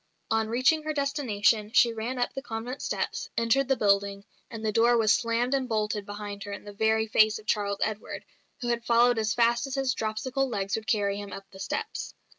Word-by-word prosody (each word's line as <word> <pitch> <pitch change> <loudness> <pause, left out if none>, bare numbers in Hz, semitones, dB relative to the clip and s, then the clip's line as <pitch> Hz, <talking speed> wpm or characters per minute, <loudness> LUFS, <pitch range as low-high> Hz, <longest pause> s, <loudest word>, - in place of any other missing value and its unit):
On 225 0 +2
reaching 255 +7 +3
her 310 0 -3
destination 235 -7 +1
she 235 -2 +5
ran 230 +3 -4
up 245 - -1
the 270 - -4
convent 245 +1 -5
steps, - - -3
entered 230 +4 +2
the 270 - +3
building, 200 -2 +1 0.2
and 225 -2 -7
the 215 - +1
door 235 +2 +4
was 220 -2 +4
slammed 235 +2 0
and 265 -2 0
bolted 210 -2 -1
behind 205 0 -6
her 205 - -6
in 200 - -7
the 205 - -10
very 220 +1 +2
face 215 0 +4
of 215 - -13
Charles 200 -2 -1
Edward, 215 -1 -4 0.4
who 240 - -2
had 235 -1 0
followed 240 0 +4
as 220 0 0
fast 235 +1 +2
as 270 - -4
his 270 -1 +1
dropsical 250 +4 -2
legs 195 -4 -1
would 220 0 -6
carry 200 -1 +1
him 205 -1 -7
up 195 - -8
the 190 - -13
steps. 435 - -4
225 Hz, 215 wpm, -27 LUFS, 210-245 Hz, 0.4 s, she